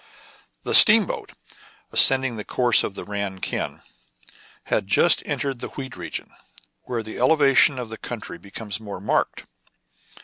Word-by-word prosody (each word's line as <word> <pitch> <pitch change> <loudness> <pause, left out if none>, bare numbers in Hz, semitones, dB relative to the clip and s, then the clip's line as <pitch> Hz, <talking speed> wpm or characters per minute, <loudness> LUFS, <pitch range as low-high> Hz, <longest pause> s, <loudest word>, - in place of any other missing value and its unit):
The - - -4
steamboat, 215 -3 +6 0.6
ascending 130 -2 +5
the 105 - -7
course 120 +1 +2
of 100 - -6
the - - -8
Ran 100 -2 -5
Kiang, - - -5 0.8
had - - -2
just - - +3
entered 135 -3 -4
the - - -6
wheat 135 -2 -9
region, 85 -3 -7 0.5
where 120 -3 -5
the 110 - -10
elevation 135 0 +3
of 125 -3 -7
the 110 - -10
country 110 -7 -8
becomes 100 +1 -7
more 100 -4 -9
marked. 100 - -2
115 Hz, 140 wpm, -22 LUFS, 100-130 Hz, 0.8 s, steamboat